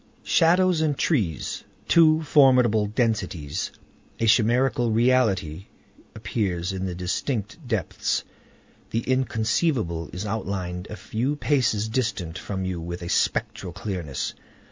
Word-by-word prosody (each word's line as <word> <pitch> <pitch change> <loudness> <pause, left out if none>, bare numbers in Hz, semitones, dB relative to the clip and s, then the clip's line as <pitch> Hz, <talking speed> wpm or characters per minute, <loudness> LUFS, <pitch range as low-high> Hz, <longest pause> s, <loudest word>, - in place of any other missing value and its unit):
Shadows 175 0 +3
and 150 -3 +1
trees—two 155 - +1
formidable 125 -8 +4
densities. 95 - -1 0.5
A 115 - +1
chimerical 120 +2 +3
reality 110 -8 +1 0.5
appears 100 -4 -2
in 95 0 -3
the 90 - -3
indistinct 100 - -3
depths. 110 -7 -1 0.7
The 115 - -1
inconceivable 115 - 0
is 95 +4 -5
outlined 95 -3 -3
a - - -6
few 125 +7 -2
paces 125 -8 +1
distant 105 -8 -2
from 95 0 -4
you 90 -2 -3
with 85 +1 -6
a 85 - -5
spectral 90 0 -1
clearness. 90 -8 -4
110 Hz, 110 wpm, -25 LUFS, 90-130 Hz, 0.7 s, formidable